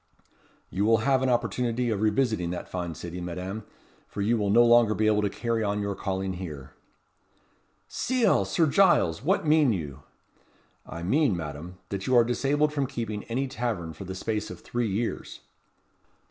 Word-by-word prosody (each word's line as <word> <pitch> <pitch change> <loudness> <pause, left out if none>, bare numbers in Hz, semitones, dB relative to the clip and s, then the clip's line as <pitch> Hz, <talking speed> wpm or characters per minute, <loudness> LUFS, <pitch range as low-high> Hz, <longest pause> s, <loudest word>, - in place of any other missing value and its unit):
"You 95 +3 -1
will 115 +1 +4
have 135 -2 +3
an 130 - +1
opportunity 120 0 0
of 105 -2 -1
revisiting 110 -4 +1
that 90 - -5
fine 90 -3 -4
city, 90 +2 -7
Madame; 90 +5 -5 0.4
for 100 - -5
you 115 +4 +2
will 105 -3 0
no 120 +4 +6
longer 120 -2 +5
be 110 +3 +1
able 105 -1 +3
to 105 - 0
carry 115 +2 -2
on 105 0 -1
your 100 -1 -2
calling 95 -1 -3
here." 75 -8 -8 1.1
"Ciel! 255 -2 +1
Sir 170 - +2
Giles! 155 - +3
what 180 +4 +1
mean 150 -4 +4
you?" 75 -8 -4 0.9
"I 85 - -7
mean, 130 - +2
Madame, 80 +3 -7
that 100 -1 -4
you 130 - +3
are 120 - +7
disabled 140 +5 +1
from 140 -3 0
keeping 115 -5 -5
any 130 +4 -2
tavern 110 -11 -3
for 85 +5 -9
the 95 +1 -6
space 110 +2 -3
of - - -9
three 120 -2 -2
years." 110 +4 -3
110 Hz, 175 wpm, -27 LUFS, 95-125 Hz, 1.1 s, are